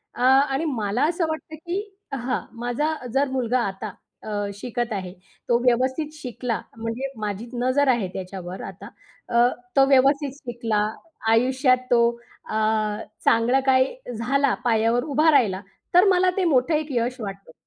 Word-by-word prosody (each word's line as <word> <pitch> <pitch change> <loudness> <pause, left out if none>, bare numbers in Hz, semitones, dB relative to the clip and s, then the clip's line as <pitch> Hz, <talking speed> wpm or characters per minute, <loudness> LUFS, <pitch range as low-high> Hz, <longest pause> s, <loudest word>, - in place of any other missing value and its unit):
अ, - - -6
आणि 270 +3 +4
मला 220 -3 -1
असं 340 -1 0
वाटतं 315 0 -5
की 345 +5 -4 0.3
हां, 255 -1 -1 0.2
माझा 295 +6 0 0.2
जर 275 +1 +2
मुलगा 255 -1 +1
आता 195 +1 -5 0.3
अ, 205 -1 -2
शिकत 240 -2 -3
आहे. 185 -2 -4 0.4
तो 235 - +5
व्यवस्थित 260 +5 +1
शिकला 245 -1 -3 0.2
म्हणजे 230 +4 -4
माझी 210 +3 -4 0.2
नजर 280 +2 +3
आहे 195 -5 -2
त्याच्यावर 185 -1 -6
आता 200 +4 -12 0.4
अ, 240 0 +5 0.3
तो 270 0 +6
व्यवस्थित 275 +1 +4
शिकला, 235 -6 -2 0.5
आयुष्यात 255 +2 +3
तो 235 -1 +5 0.5
अ, - - -3 0.7
चांगलं 235 +4 +4
काही 260 - +3 0.2
झाला, 275 +3 +1
पायावर 230 +1 +2
उभा 305 +2 +3
राहिला, 205 -9 +3 0.3
तर 360 - +8
मला 365 0 +4
ते 380 - +2
मोठं 285 0 +3
एक 305 0 -1
यश 250 +2 -3
वाटतं. 195 -4 -7
250 Hz, 145 wpm, -24 LUFS, 225-275 Hz, 0.7 s, तर